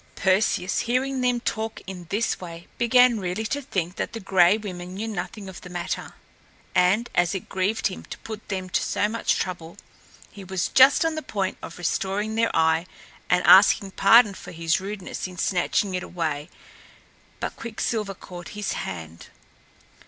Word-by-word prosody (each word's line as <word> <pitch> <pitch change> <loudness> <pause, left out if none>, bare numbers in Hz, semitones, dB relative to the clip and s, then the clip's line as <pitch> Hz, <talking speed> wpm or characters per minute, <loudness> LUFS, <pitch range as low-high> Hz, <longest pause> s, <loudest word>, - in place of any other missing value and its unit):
Perseus, 190 -1 +1
hearing 260 +2 0
them 245 -1 +2
talk 220 -1 -3
in 180 -3 -8
this 215 +4 0
way, 170 -1 -8
began 240 -1 +5
really 185 +3 -3
to 280 +6 -2
think 185 - -3
that - - -3
the 225 - -5
Gray 190 0 +4
Women 180 -4 -7
knew 215 +3 -4
nothing 205 0 -5
of 190 -2 -9
the 180 - -10
matter; 175 -1 -4 0.6
and, 195 +7 +3
as 175 +2 +2
it 190 - -5
grieved 195 +4 -1
him 190 - -1
to - - -8
put 220 -1 -9
them 190 -2 -3
to - - +1
so 210 - 0
much 225 +2 0
trouble, 170 -3 -5 0.5
he 200 - -10
was 190 -1 -2
just 265 +4 +6
on 325 - +1
the 315 - -3
point 195 -9 -3
of 170 - -8
restoring 195 +4 -1
their 230 +1 +2
eye 160 +1 +2 0.4
and 180 0 +3
asking 195 0 +7
pardon 210 +2 +6
for - - -10
his 165 +1 0
rudeness 195 -1 -5
in 180 -1 -11
snatching 185 +2 0
it 180 - -1
away. 155 -5 -3 0.9
But - - -4
Quicksilver 220 -3 -3
caught 175 -1 -10
his 210 - -2
hand. 80 -2 -6
195 Hz, 170 wpm, -25 LUFS, 180-220 Hz, 0.9 s, asking